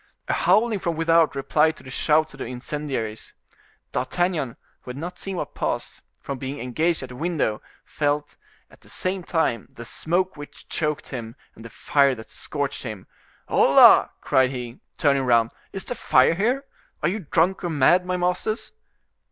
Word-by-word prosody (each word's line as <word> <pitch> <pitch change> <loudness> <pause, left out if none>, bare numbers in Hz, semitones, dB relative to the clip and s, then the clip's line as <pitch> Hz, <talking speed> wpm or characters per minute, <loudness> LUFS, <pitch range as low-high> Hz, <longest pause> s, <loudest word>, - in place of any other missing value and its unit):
A - - +1
howling 220 -2 +3
from 170 -2 -2
without 165 -1 +3
replied 150 +3 +2
to - - -16
the 130 - -10
shouts 155 +3 +2
of - - -14
the - - -4
incendiaries. 125 -4 -4 0.6
D'Artagnan, 155 -1 -1 0.2
who - - -12
had 125 - -6
not 175 +5 -6
seen 195 -1 -5
what - - -4
passed, - - -3 0.2
from 140 -2 -6
being 135 +2 -5
engaged 155 +6 0
at 130 - -7
the 125 - -9
window, 155 -8 -1 0.2
felt, 145 0 -1 0.4
at - - -20
the - - -17
same 185 +1 -2
time, 160 -10 0
the 120 - -10
smoke 180 +9 -1
which 145 -1 -11
choked 150 -2 -2
him 115 -3 -6 0.2
and 110 - -14
the 115 - -9
fire 140 +4 +2
that 110 -1 -12
scorched 145 -2 -4
him. 110 -6 -7 0.4
"Hola!" - - +7
cried 130 -1 +3
he, 125 -2 -6 0.2
turning 140 -2 +2
round, 115 -2 +3 0.2
"is 195 - -5
the - - -4
fire 130 - +4
here? 245 +10 0 0.4
Are - - +4
you 205 +5 -2
drunk 180 +2 +1
or 175 - -1
mad, 160 +4 +4
my 180 0 -2
masters?" 195 +5 -1
150 Hz, 175 wpm, -24 LUFS, 130-175 Hz, 0.6 s, Hola